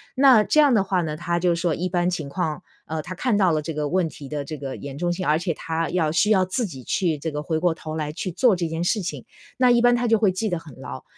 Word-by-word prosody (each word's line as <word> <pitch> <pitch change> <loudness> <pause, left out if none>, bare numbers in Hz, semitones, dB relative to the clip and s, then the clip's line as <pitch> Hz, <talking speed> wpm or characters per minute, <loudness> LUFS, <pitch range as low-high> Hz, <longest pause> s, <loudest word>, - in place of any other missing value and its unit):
那 260 -5 +6
这 305 - +2
样 290 -3 +6
的 210 -4 +4
话 190 -2 0
呢， 155 -2 -3
他 170 +2 -2
就 175 0 +2
说 170 -2 0
一 180 - -2
般 175 -1 0
情 165 -5 -3
况， 155 +1 -3 0.2
呃， 160 0 -3
他 180 - -6
看 230 +2 +1
到 190 -4 +3
了 155 -1 +1
这 160 - -5
个 150 -1 -2
问 180 +1 +1
题 145 -2 -10
的 145 0 -4
这 155 +2 -7
个 135 -1 -6
严 140 -1 -8
重 175 +2 0
性， 185 +1 -4
而 150 +1 +3
且 170 +1 -2
他 165 +1 -3
要 165 -4 +1
需 180 +6 +2
要 190 -3 +5
自 205 +7 -1
己 135 -10 -8
去 165 +3 0
这 160 - -3
个 150 0 -4
回 160 0 -1
过 175 0 +2
头 155 -1 -7
来 150 -2 -3
去 180 +4 -4
做 205 +5 +3
这 175 -2 -2
件 160 +1 -3
事 210 +4 +1
情， 180 - -5 0.3
那 255 -1 +4
一 240 - +5
般 245 0 +5
他 240 0 0
就 225 0 +4
会 210 -3 +3
记 210 +4 -2
得 175 - -1
很 160 -4 -13
牢。 65 - -8
175 Hz, 315 characters per minute, -23 LUFS, 155-195 Hz, 0.3 s, 那